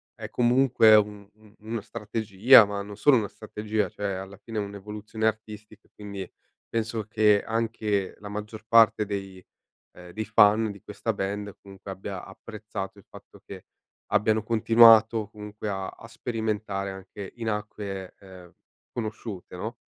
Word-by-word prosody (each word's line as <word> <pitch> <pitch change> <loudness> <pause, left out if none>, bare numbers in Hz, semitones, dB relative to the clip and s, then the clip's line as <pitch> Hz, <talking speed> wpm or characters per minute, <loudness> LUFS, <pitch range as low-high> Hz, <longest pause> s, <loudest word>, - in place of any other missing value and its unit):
è - - -8
comunque 120 -2 +5
un 105 -1 0
un 110 -1 -21
una 110 +1 -5
strategia, 110 +1 +4
ma 100 0 -4
non 100 0 -9
solo 135 +4 +5
una 105 -3 -1
strategia, 105 0 -3
cioè 100 -2 -4
alla 95 +1 -9
fine 110 +2 -8
è - - +1
un'evoluzione 105 +2 -4
artistica. 110 -1 -6
Quindi 100 -3 -7 0.4
penso 115 -1 -2
che 105 -1 +3
anche 110 -3 -1
la 105 - -9
maggior 105 +1 -7
parte 115 -2 +5
dei, 95 -2 -6 0.5
ehm, 90 0 -12
dei 110 0 -4
fan 110 +1 +4
di 100 0 -15
questa 110 +2 -3
band 100 +1 -4
comunque 100 0 -11
abbia 95 0 -6
apprezzato 105 -2 -8
il 100 - -17
fatto - - -15
che - - -10 0.5
abbiano 110 +1 +2
continuato 115 -1 +6
comunque 105 0 -7
a 95 -1 -3
a 115 - -11
sperimentare 110 -4 -3
anche 95 +1 -9
in 115 -1 -4
acque, 105 -3 -5
ehm, 90 -3 -14 0.4
conosciute, 110 -5 -6
no? 110 +6 -5
105 Hz, 150 wpm, -26 LUFS, 100-110 Hz, 0.5 s, continuato